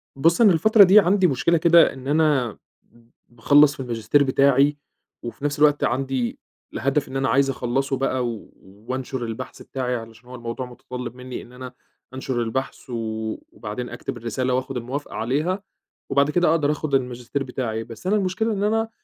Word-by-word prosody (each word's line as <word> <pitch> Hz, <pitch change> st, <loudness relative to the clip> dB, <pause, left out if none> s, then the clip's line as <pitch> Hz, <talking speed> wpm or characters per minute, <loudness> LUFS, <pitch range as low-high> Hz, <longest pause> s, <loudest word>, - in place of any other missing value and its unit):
بُص 165 Hz, -, +3 dB
أنا 205 Hz, -6 st, +7 dB
الفترة 215 Hz, +6 st, +6 dB
دي 195 Hz, +3 st, +7 dB
عندي 190 Hz, 0 st, +3 dB
مشكلة 155 Hz, +4 st, +2 dB
كده، 170 Hz, +1 st, +5 dB
إن 130 Hz, 0 st, -10 dB
أنا 145 Hz, -7 st, +1 dB, 0.3 s
ب 115 Hz, 0 st, -26 dB, 0.2 s
باخلص 145 Hz, +5 st, +4 dB
في -, -, -21 dB
الماجستير 125 Hz, +3 st, +1 dB
بتاعي، 140 Hz, +1 st, +3 dB, 0.5 s
وفي 120 Hz, +4 st, -6 dB
نفس 145 Hz, 0 st, -1 dB
الوقت 150 Hz, -1 st, +4 dB
عندي 130 Hz, -1 st, -1 dB, 0.3 s
الهدف 140 Hz, +4 st, 0 dB
إن 135 Hz, -, -5 dB
أنا 135 Hz, -1 st, 0 dB
عايز 135 Hz, +3 st, +3 dB
أخلّصه 135 Hz, +1 st, -1 dB
بقى 130 Hz, -2 st, -1 dB
و 115 Hz, -3 st, -7 dB, 0.4 s
وأنشُر 130 Hz, 0 st, -3 dB
البحث 115 Hz, -1 st, -7 dB
بتاعي 125 Hz, -2 st, -3 dB
علشان 115 Hz, +1 st, -10 dB
هو 125 Hz, -, -8 dB
الموضوع 120 Hz, +1 st, -5 dB
مُتطلب 125 Hz, -1 st, -8 dB
منّي، 125 Hz, 0 st, -7 dB
إن 120 Hz, -, -15 dB
أنا 125 Hz, 0 st, -9 dB, 0.4 s
أنشُر 130 Hz, -2 st, -3 dB
البحث 130 Hz, +4 st, -4 dB
و -, -, -6 dB, 0.6 s
وبعدين 115 Hz, +3 st, -6 dB
أكتب 120 Hz, 0 st, -6 dB
الرسالة 125 Hz, +2 st, -2 dB
وآخد 130 Hz, +1 st, -2 dB
الموافقة 130 Hz, +5 st, -5 dB
عليها، 155 Hz, -, -1 dB, 0.5 s
وبعد 140 Hz, +1 st, +2 dB
كده 175 Hz, +1 st, +3 dB
أقدر 150 Hz, -3 st, +2 dB
آخد 150 Hz, -2 st, -1 dB
الماجستير 125 Hz, +1 st, -2 dB
بتاعي، 120 Hz, -4 st, -3 dB
بس 115 Hz, +9 st, -9 dB
أنا 205 Hz, -, +3 dB
المشكلة 205 Hz, +3 st, 0 dB
إن 200 Hz, -1 st, -2 dB
أنا 225 Hz, +1 st, +1 dB
130 Hz, 175 wpm, -23 LUFS, 125-150 Hz, 0.6 s, أنا